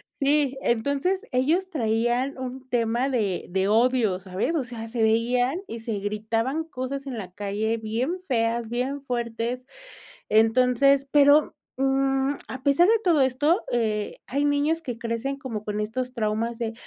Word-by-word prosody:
Sí, 280 -1 +1
entonces 280 - 0
ellos 320 +10 +1
traían 240 0 0
un 260 0 -6
tema 240 +2 +1
de 210 -8 -1
de 190 +2 0
odio, 225 -3 +2
¿sabes? 190 - -2
O 285 - +1
sea, 230 -2 -7
se 225 0 -1
veían 245 +7 +2
y 230 - -6
se 225 -3 -3
gritaban 225 +8 -1
cosas 275 -2 -5
en 255 -4 -5
la 185 -3 -7
calle 210 +3 -2
bien 235 +11 -2
feas, 230 -7 0
bien 260 +4 -3
fuertes, 240 0 -3 0.6
entonces, 250 +5 +4
pero, 290 +1 +5 0.2
mm, 270 +1 +1
a 260 0 -7
pesar 285 +6 +4
de 455 -1 +4
todo 330 -6 +4
esto, 290 +7 +2
eh, 215 -3 -1
hay 280 +3 0
niños 290 +3 +1
que 245 -4 -5
crecen 230 +4 -3
como 230 -6 -5
con 210 0 -3
estos 250 +4 -3
traumas 225 0 -1
de: 225 -1 -2
250 Hz, 155 wpm, -25 LUFS, 225-275 Hz, 0.6 s, pero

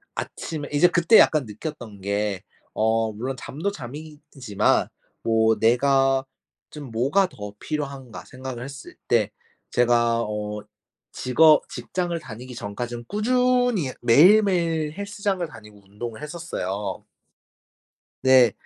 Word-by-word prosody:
아침 155 -3 -5
이제 150 +5 +5
그때 175 +4 +5
약간 150 -5 +4
느꼈던 110 -2 -8
게 100 -1 -1 0.4
어 110 0 +1
물론 130 +5 -4
잠도 165 +9 -3
잠이지만 145 - -2 0.3
뭐 110 0 +3
'내가 135 +3 +3 0.5
좀 145 -5 -9
뭐가 135 - +2
더 105 - -8
필요한가?' 140 -5 -5
생각을 130 -2 -7
했을 140 0 -10
때 105 -3 +2 0.4
제가 120 -1 +3
어 105 0 -4 0.5
직업 150 +4 +4
직장을 175 -2 -3
다니기 125 0 -9
전까지는 120 +2 -6
꾸준히 245 - +1
매일매일 165 - +4
헬스장을 200 -1 -3
다니고 105 -6 -15
운동을 110 +5 -7
했었어요. 105 - -5 1.2
네. 130 -2 +6
130 Hz, 240 characters per minute, -24 LUFS, 110-160 Hz, 1.2 s, 네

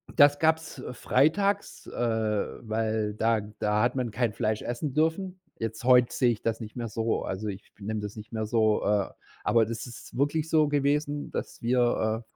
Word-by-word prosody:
das 145 -1 +6
gab's 160 -4 +1
freitags, 160 +12 +1
äh, - - -7
weil 110 -1 -1
da 110 0 +2 0.2
da 105 0 +2
hat 125 +2 +1
man 125 -3 -1
kein 115 -1 0
Fleisch 110 0 -1
essen 125 +4 -3
dürfen. 170 +5 0 0.2
Jetzt, 115 0 -4
heute 125 -1 +5
sehe 125 -2 +3
ich 110 - -4
das 115 0 -1
nicht 110 -1 -8
mehr 120 -2 -3
so, 115 +1 -1
also 95 +3 -4
ich 100 0 -7
be 100 - -15
nehme 110 +1 -2
das 105 0 -6
nicht 110 +2 -10
mehr 110 -1 -2
so, 110 -1 +2
äh, 105 -1 +2 0.3
aber 115 -1 +4
das 115 +2 -5
ist 120 - -11
wirklich 150 +3 +1
so 155 -2 +4
gewesen, 145 0 0
dass - - -5
wir, 120 -2 +1
115 Hz, 185 wpm, -28 LUFS, 110-145 Hz, 0.3 s, das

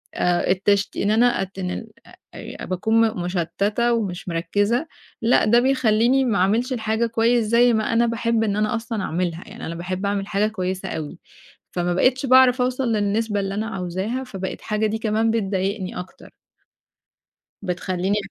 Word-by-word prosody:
آآ 175 0 +1
التشت 200 +1 +1
إن 205 - +1
أنا 235 -2 +3
أتنل 190 +3 -5 0.5
آآ - - -8
باكون 220 +5 +1
م 215 -5 -4
مُشتَّتة 200 +7 0
ومش 190 -6 -3
مركِّزة 205 - 0 0.3
لأ، 235 +2 +3
ده 235 +3 +5
بيخلّيني 255 0 +3
ما 225 -6 +1
أعملش 225 +8 +1
الحاجة 220 -1 0
كويس 230 +1 +2
زي 235 +2 +4
ما 220 +1 0
أنا 235 +1 +3
باحب 230 -1 0
إن 205 -2 0
أنا 215 +2 0
أصلًا 225 -3 -3
أعملها، 175 0 -2
يعني 225 +4 -9
أنا 165 - -5
باحب 185 +3 -4
أعمل 200 0 0
الحاجة 200 +1 0
كويسة 190 -3 -3
أوي، 160 +2 -6 0.5
فما 175 0 -1
بقيتش 255 +8 +2
باعرف 255 -1 +5
أوصل 255 -1 0
للنسبة 210 +1 0
اللي 195 0 -2
أنا 215 +1 -2
عاوزاها، 195 +6 -3
فبقت 190 -7 -6
حاجة 215 0 0
دي 220 - -2
كمان 220 +1 +1
بتضايقني 195 -3 -2
أكتر. 180 - -11 1.3
بتخلّيني 185 +1 -1
215 Hz, 155 wpm, -22 LUFS, 185-230 Hz, 1.3 s, ده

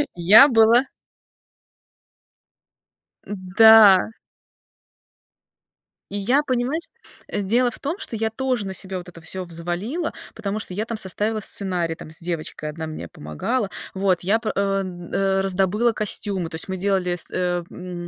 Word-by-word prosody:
Я 200 +10 +8
была 235 0 +5 2.4
М-да. 205 +1 +6 2.0
И 205 - -4
я, 245 +9 +2
понимаешь, 260 +4 -1 0.5
дело 235 +5 +1
в - - -10
том, 290 +6 -3
что 230 - -5
я 220 0 -1
тоже 250 -1 -2
на 190 - -5
себя 190 0 -2
вот 180 0 -8
это 170 -1 -14
всё 185 +4 -4
взвалила, 175 - -4 0.2
потому 215 -1 -3
что 195 - -6
я 210 +4 -2
там 230 -1 -5
составила 210 +3 -1
сценарий 180 -5 -2
там 155 - -11
с 160 - -7
девочкой, 165 -3 -5
одна 160 +1 -6
мне 155 - -7
помогала. 190 - -3 0.2
Вот 190 -2 +1
я 205 +5 +2
п 225 - -3
э, - - -2 0.2
м, 175 -2 -8
э, 195 0 +1
раздобыла 195 +5 +1
костюмы. 200 -4 -1
То 160 - -8
есть 160 - -1
мы 190 0 -4
делали 185 -2 0
с, 175 - -6
э, 180 -1 -1
м, 180 -1 -7
195 Hz, 150 wpm, -22 LUFS, 180-225 Hz, 2.4 s, Я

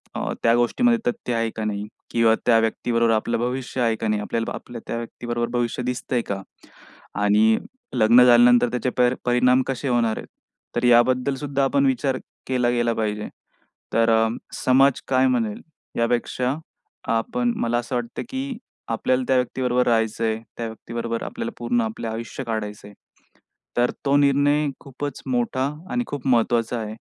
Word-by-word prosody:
अ, - - -2
त्या 115 - +5
गोष्टीमध्ये 235 - +3
तथ्य 235 - -2
आहे 115 0 0
का 110 - -3
नाही? 105 0 -3 0.2
किंवा 115 -1 +4
त्या 115 -2 +5
व्यक्तीबरोबर 115 +1 +1
आपलं 115 +2 0
भविष्य 125 +1 -2
आहे 115 -2 +2
का 110 - -3
नाही? 105 -1 0
आपल्याला 115 +2 -2
आपल्या 120 -2 -8
त्या - - -3
व्यक्तीबरोबर 120 0 -3
भविष्य 120 +1 -1
दिसतंय 125 0 -1
का? 95 -1 -2 0.8
आणि 105 +2 +4 0.4
लग्न 115 +3 +6
झाल्यानंतर 120 0 +6
त्याचे 125 +1 -1
पर 125 0 +4
परिणाम 125 +1 +4
कसे 135 +1 -3
होणार 115 -3 +1
आहेत, - - -7 0.5
तर - - 0
याबद्दलसुद्धा 130 +3 +3
आपण 140 +1 +2
विचार 130 0 +1 0.3
केला 125 -2 +1
गेला 120 -1 +1
पाहिजे. 105 -1 -2 0.7
तर 115 0 +3
अ, 110 0 +4 0.3
समाज 135 +1 +3
काय 130 0 +3
म्हणेल? 115 -5 0 0.4
यापेक्षा 125 +2 0 0.6
आपण 120 +2 0
मला 120 +1 0
असं 120 +1 -3
वाटतं, 120 -1 -3
की 265 -2 -4 0.3
आपल्याला 125 +3 +1
त्या 130 - +3
व्यक्तीबरोबर 125 0 +1
राहायचं 115 -1 +1
आहे. 110 0 0 0.2
त्या 115 - -3
व्यक्तीबरोबर 115 +1 -5
आपल्याला 115 - -4
पूर्ण 120 0 0
आपलं 110 +1 -4
आयुष्य 115 +4 -5
काढायचं 105 -3 -4
आहे. 105 - -13 0.8
तर 120 0 +3
तो 140 +1 +3
निर्णय 145 +1 +3
खूपच 140 0 -6
मोठा 130 +1 0 0.2
आणि 245 0 0
खूप 140 -2 -5
महत्त्वाचा 120 -1 +2
आहे 110 0 -5
120 Hz, 155 wpm, -23 LUFS, 115-130 Hz, 0.8 s, लग्न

